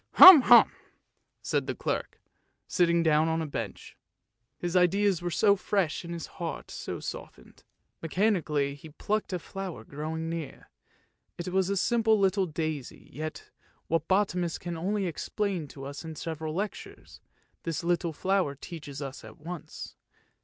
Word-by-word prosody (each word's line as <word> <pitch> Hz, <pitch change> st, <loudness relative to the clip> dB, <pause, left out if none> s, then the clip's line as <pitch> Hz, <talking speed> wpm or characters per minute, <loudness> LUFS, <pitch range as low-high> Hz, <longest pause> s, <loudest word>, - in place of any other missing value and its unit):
Hum! 370 Hz, -6 st, +12 dB
hum! -, -, +7 dB, 0.4 s
" -, -, -49 dB, 0.3 s
said -, -, -1 dB
the -, -, -2 dB
clerk, -, -, -3 dB, 0.5 s
sitting 170 Hz, -1 st, +3 dB
down 155 Hz, 0 st, +3 dB
on 160 Hz, 0 st, 0 dB
a 160 Hz, -, -2 dB
bench; 115 Hz, -8 st, -6 dB, 0.6 s
his 175 Hz, 0 st, -3 dB
ideas 185 Hz, +1 st, +3 dB
were 175 Hz, -, -2 dB
so 200 Hz, +4 st, +4 dB
fresh 190 Hz, -5 st, -1 dB
and 170 Hz, -, -7 dB
his 170 Hz, -1 st, -5 dB
heart 165 Hz, -4 st, -6 dB
so -, -, -5 dB
softened. -, -, -9 dB, 0.4 s
Mechanically 165 Hz, -6 st, +1 dB
he 145 Hz, +3 st, -12 dB
plucked 210 Hz, +8 st, -2 dB
a 180 Hz, -, 0 dB
flower 185 Hz, -5 st, -7 dB
growing 155 Hz, +5 st, -5 dB
near; 165 Hz, -4 st, -6 dB, 0.7 s
it 175 Hz, +1 st, -4 dB
was 190 Hz, 0 st, +1 dB
a 200 Hz, -, 0 dB
simple 220 Hz, +1 st, +3 dB
little 195 Hz, -1 st, +2 dB
daisy, 155 Hz, -4 st, -5 dB
yet 155 Hz, +3 st, -6 dB, 0.4 s
what 165 Hz, -1 st, 0 dB
botanists 180 Hz, -4 st, +1 dB
can 175 Hz, -1 st, -5 dB
only 195 Hz, +4 st, -1 dB
explain 180 Hz, 0 st, -2 dB
to 135 Hz, 0 st, -11 dB
us 140 Hz, +2 st, -7 dB
in 160 Hz, -1 st, -7 dB
several 160 Hz, 0 st, -5 dB
lectures, 205 Hz, +3 st, -6 dB, 0.4 s
this 165 Hz, -2 st, -3 dB
little 175 Hz, 0 st, 0 dB
flower 185 Hz, -2 st, 0 dB
teaches 145 Hz, -2 st, -8 dB
us 135 Hz, 0 st, -7 dB
at -, -, -12 dB
once. 170 Hz, +1 st, -8 dB
170 Hz, 155 wpm, -28 LUFS, 155-190 Hz, 0.7 s, Hum